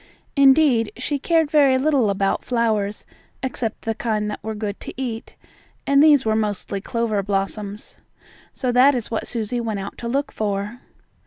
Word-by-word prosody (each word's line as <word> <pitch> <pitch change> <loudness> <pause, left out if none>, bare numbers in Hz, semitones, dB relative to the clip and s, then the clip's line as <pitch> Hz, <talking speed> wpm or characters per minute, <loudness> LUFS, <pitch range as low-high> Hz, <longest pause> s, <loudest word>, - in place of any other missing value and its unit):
Indeed, 270 -5 +5
she 280 +3 -2
cared 320 0 +1
very 280 -4 +5
little 265 -5 +2
about 195 0 0
flowers, 220 -4 -1 0.4
except 240 -4 -3
the 225 - -1
kind 215 -2 -2
that - - -7
were 220 +1 -4
good 210 -1 -4
to - - -9
eat, 235 -4 -5 0.5
and 280 0 +4
these 290 -4 +6
were 220 0 +2
mostly 205 -2 -2
clover 225 -2 -1
blossoms. 200 +1 -4 0.5
So 255 -2 -2
that 255 +3 +5
is 235 -2 -4
what 225 - -2
Susie 235 +1 -2
went 220 -3 -3
out 195 +1 -7
to 235 - -5
look 275 +4 -1
for. 210 +2 -3
230 Hz, 165 wpm, -22 LUFS, 210-265 Hz, 0.5 s, these